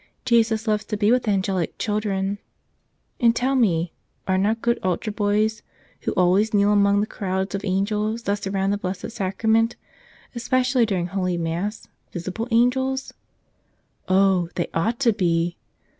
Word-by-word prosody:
Jesus 225 -2 +2
loves 210 0 +1
to 210 - -3
be 205 +1 +3
with 250 -2 +2
angelic 190 -4 0
children. 205 -2 -1 0.8
And, 235 -2 +4
tell 255 +3 +1
me, 175 -10 +1 0.3
are 190 - +2
not 210 +4 0
good 235 0 +1
altar 185 +4 -1
boys, 210 +1 0 0.4
who - - -2
always 190 +4 +3
kneel 205 0 +4
among 200 0 +4
the - - +1
crowds 190 -2 -3
of 200 0 -3
angels 210 +3 -1
that 200 0 -1
surround 195 0 0
the 205 - -2
Blessed 190 +4 -4
Sacrament, 220 +3 +1 0.6
especially 250 0 +1
during 185 -5 -1
Holy 185 -1 -1
Mass, 170 +6 -3 0.3
vis¬ 175 0 -5
ible 225 +5 -3
angels? 260 +3 +1 0.9
Oh, 185 -2 +3
they 175 - -2
ought 220 +9 0
to 235 -4 +4
be! 170 -3 0
205 Hz, 150 wpm, -23 LUFS, 190-225 Hz, 0.9 s, And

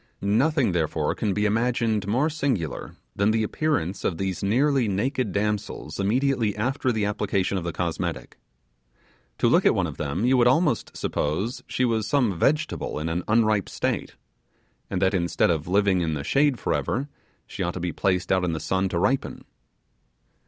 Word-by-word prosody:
Nothing, 125 - +2
therefore, 80 -3 0
can 105 - -1
be 105 +2 0
imagined 110 -1 +1
more 125 +9 +2
singular 135 - -2 0.2
than 100 +1 +2
the 110 0 +2
appearance 105 - -1
of 85 - -1
these 95 -1 -3
nearly 130 +5 +2
naked 115 +3 -1
damsels 100 -5 -3
immediately 115 +1 +1
after 130 +4 0
the 110 -3 0
application 100 -2 -1
of 95 - -2
the 85 - -2
cosmetic. 85 0 -4 1.0
To - - +2
look - - +4
at - - +4
one - - +1
of - - -6
them 75 +9 -2
you 130 +1 +4
would 120 -1 +5
almost 130 -1 +1
suppose 95 - -2
she 130 - 0
was 110 -3 0
some 125 -9 +2
vegetable 155 - 0
in 75 +2 -2
an 85 +2 -1
unripe 110 -3 +2
state; - - -2 0.7
and 95 - -2
that, 95 - +3
instead 85 -1 +2
of 80 -1 -2
living 95 -1 +2
in 80 -2 -1
the 70 - -4
shade 140 - +2
for - - -1
ever, 135 +4 -1 0.4
she - - -7
ought 85 - -1
to - - -3
be 85 -2 -3
placed 90 0 0
out 95 -1 +3
in 85 -2 0
the 80 - -3
sun 95 +3 0
to 85 - -2
ripen. 130 +10 0
105 Hz, 180 wpm, -25 LUFS, 90-125 Hz, 1.0 s, would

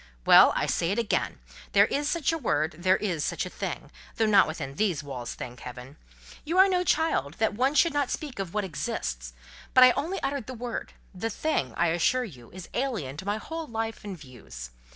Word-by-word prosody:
Well, - - +8
I - - +1
say 165 - 0
it 200 - 0
again. 230 -3 0 0.4
There - - +7
is 290 +1 -1
such 330 -1 +1
a - - 0
word, 155 - 0
and 170 +2 -14
there 185 0 +4
is 175 -8 -2
such - - -1
a - - -7
thing—though 225 - -4
not 205 -3 +5
within 150 -4 -5
these 175 -2 0
walls, 130 -4 -6
thank 125 -1 -8
heaven! 125 +3 -9 0.5
You 330 +4 -2
are 380 +1 +8
no 365 -2 +1
child 310 - +1
that 220 -1 +1
one 260 +7 +1
should 335 +1 +4
not 285 -3 0
speak 285 -8 -5
of 190 -3 -3
what 210 +1 -1
exists; - - -4 0.4
but 255 - +9
I 255 - +9
only 340 +9 -2
uttered 275 -5 -2
the 255 - -6
word—the 225 -3 -6
thing, 205 - -1
I 170 0 +3
assure 175 +10 +2
you, 130 - -11
is 185 0 -10
alien 225 - -2
to 190 +4 -7
my 205 +1 0
whole 325 +7 -6
life 225 -1 -4
and 200 -3 -6
views. 65 - -10
205 Hz, 210 wpm, -27 LUFS, -, 0.5 s, but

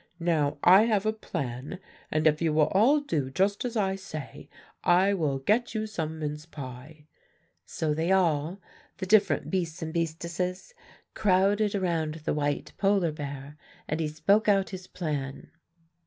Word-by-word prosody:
Now, 160 -4 +1
I 190 +5 +7
have 215 -3 +1
a 215 - +2
plan; 135 - -5 0.3
and 155 0 0
if 155 0 +3
you 160 -2 +1
will 150 -1 +3
all 255 +10 +4
do 155 - -2
just 195 +8 0
as 240 -1 -2
I 190 -2 +1
say, 155 -7 -8 0.3
I 185 +3 +4
will 150 -8 0
get 220 - 0
you 215 0 -1
some 160 -7 -4
mince 150 0 -5
pie.' 140 +1 -10 0.6
So 155 -2 -1
they 165 +4 0
all 170 -1 +1 0.4
the 190 - -4
different 210 +2 +3
beasts 175 -3 -2
and 160 0 -5
beastesses 170 - -3 0.4
crowded 205 +1 +2
around 165 -5 -1
the - - +1
white 145 -1 -2
polar 195 -4 +2
bear, 145 -1 -7 0.3
and 155 - -2
he 160 - 0
spoke 195 +9 +2
out 195 -1 +2
his 185 -1 -8
plan. 145 -6 -4
170 Hz, 155 wpm, -28 LUFS, 150-195 Hz, 0.6 s, I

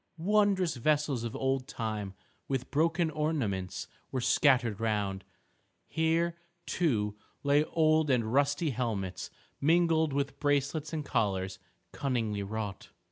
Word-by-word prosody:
Wondrous 190 -3 +2
vessels 145 -1 +1
of 115 - -4
old 135 -1 0
time 105 -4 -4 0.3
with 135 -2 -2
broken 165 +2 +2
ornaments 135 - -2 0.2
were 130 - -1
scattered 120 -4 +3
round. 105 -4 -1 0.6
Here, 165 +1 +1 0.3
too, 110 -15 0 0.3
lay 145 +1 +4
old 155 -2 +3
and 115 -3 +1
rusty 145 +3 +2
helmets, 110 -7 -3 0.3
mingled 160 0 +3
with 140 0 -2
bracelets 145 +1 0
and 155 -3 -3
collars 95 -7 -1 0.3
cunningly 115 -7 -1
wrought. 105 -1 -5
140 Hz, 115 wpm, -30 LUFS, 110-155 Hz, 0.6 s, lay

